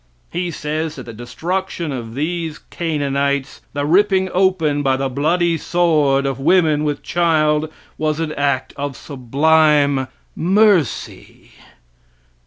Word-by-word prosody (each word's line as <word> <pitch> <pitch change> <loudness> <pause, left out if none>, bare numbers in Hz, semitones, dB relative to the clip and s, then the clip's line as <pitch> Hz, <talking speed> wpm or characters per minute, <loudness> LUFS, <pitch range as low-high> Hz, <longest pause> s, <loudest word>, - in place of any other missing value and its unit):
He 175 +1 -2
says 155 0 -3
that 130 - -8
the 115 - -9
destruction 165 - -4
of 115 -3 -6
these 160 +1 -3
Canaanites, 140 -4 -1
the 145 0 -2
ripping 190 +3 +3
open 180 -6 +2
by 135 -2 +1
the 135 0 -1
bloody 165 +5 +1
sword 150 -6 +2
of 135 -1 -2
women 155 0 +3
with 145 -1 -2
child 155 -2 +1 0.3
was 155 0 0
an 160 -2 -2
act 140 -3 -1
of 140 -2 -4
sublime 145 +1 +2 0.3
mercy. 190 - +1
150 Hz, 120 wpm, -19 LUFS, 140-170 Hz, 0.3 s, ripping